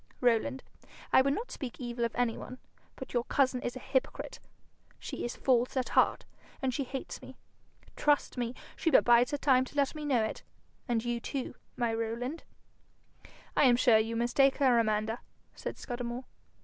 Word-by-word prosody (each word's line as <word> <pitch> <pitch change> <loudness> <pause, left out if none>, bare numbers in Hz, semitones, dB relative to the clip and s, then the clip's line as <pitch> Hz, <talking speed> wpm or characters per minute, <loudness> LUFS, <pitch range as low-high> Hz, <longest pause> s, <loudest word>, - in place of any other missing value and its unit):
Rowland, 250 +2 +1 0.5
I - - +8
would 275 +2 +2
not 470 - -5
speak 255 -5 -6
evil 240 -2 -3
of 230 - -4
any 245 -2 +1
one, 255 - -8 0.4
but - - -8
your 240 -1 +1
cousin 260 -2 +2
is 245 - -3
a - - -5
hypocrite. 270 - -2 0.6
She - - -6
is 240 - -3
false 250 0 +2
at 255 - 0
heart, - - +3 0.3
and 265 -3 -1
she 275 +2 -1
hates 265 +1 -6
me. - - -11 0.6
Trust 295 -1 +2
me, 245 -1 -2 0.2
she 330 - +1
but - - +5
bides 240 +1 +6
her 290 - -1
time 265 -3 +4
to 260 - -13
let 280 -2 +2
me 305 -1 -6
know 260 -6 +2
it 220 - -3 0.5
and 235 -2 0
you 240 0 -1
too, 260 +2 -4 0.2
my 235 -2 +1
Rowland.' 230 +7 -3 1.1
'I - - +4
am 250 -3 +6
sure 240 -2 +5
you 225 +1 -1
mistake 255 +4 +3
her, 255 -4 +4
Amanda,' 215 +1 0 0.3
said - - -6
Scudamore. 245 0 -5
245 Hz, 180 wpm, -31 LUFS, 235-270 Hz, 1.1 s, I